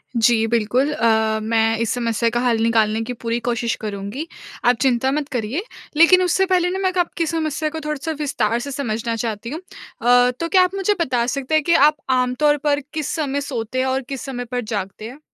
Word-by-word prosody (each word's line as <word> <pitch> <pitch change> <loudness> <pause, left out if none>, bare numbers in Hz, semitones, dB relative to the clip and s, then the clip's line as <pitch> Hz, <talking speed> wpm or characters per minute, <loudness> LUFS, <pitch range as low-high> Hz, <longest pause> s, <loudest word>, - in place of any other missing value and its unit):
जी 225 -1 +3
बिल्कुल 235 +5 +1
अ, 220 -4 +2
मैं 225 0 +1
इस 230 - 0
समस्या 230 -1 0
का 240 +1 -1
हल 240 -2 +1
निकालने 225 -1 +2
की 250 +2 -5
पूरी 230 +1 -1
कोशिश 235 -1 0
करुँगी। 210 +8 -5 0.4
आप 245 0 +5
चिंता 265 0 +2
मत 290 0 -1
करिए, 250 - -2 0.3
लेकिन 365 +3 +7
उससे 370 +2 +2
पहले 360 -1 +3
ना 380 +1 -3
मैं 375 -1 +1
क - - -5
आपकी 330 - -3
समस्या 315 -1 -1
को 320 +1 -6
थोड़ा 300 0 -1
सा 320 - -1
विस्तार 240 -6 0
से 280 +3 -6
समझना 230 -4 -2
चाहती 225 0 -4
हूँ। 310 +4 -5 0.4
अ, 245 +1 +5
तो 335 - -1
क्या 370 -2 +5
आप 365 +2 -1
मुझे 395 +1 +1
बता 250 -7 +1
सकते 275 +3 -1
हैं 310 - +3
कि 340 - +2
आप 300 +2 +5
आमतौर 260 +4 +2
पर 290 -1 +2
किस 310 -2 -3
समय 285 -2 -1
सोते 255 -2 -4
हैं 260 - +1
और 265 +1 0
किस 270 -2 -4
समय 245 -2 -5
पर 245 0 -1
जागते 210 -1 -5
हैं? 270 +4 -12
250 Hz, 215 wpm, -21 LUFS, 230-300 Hz, 0.4 s, लेकिन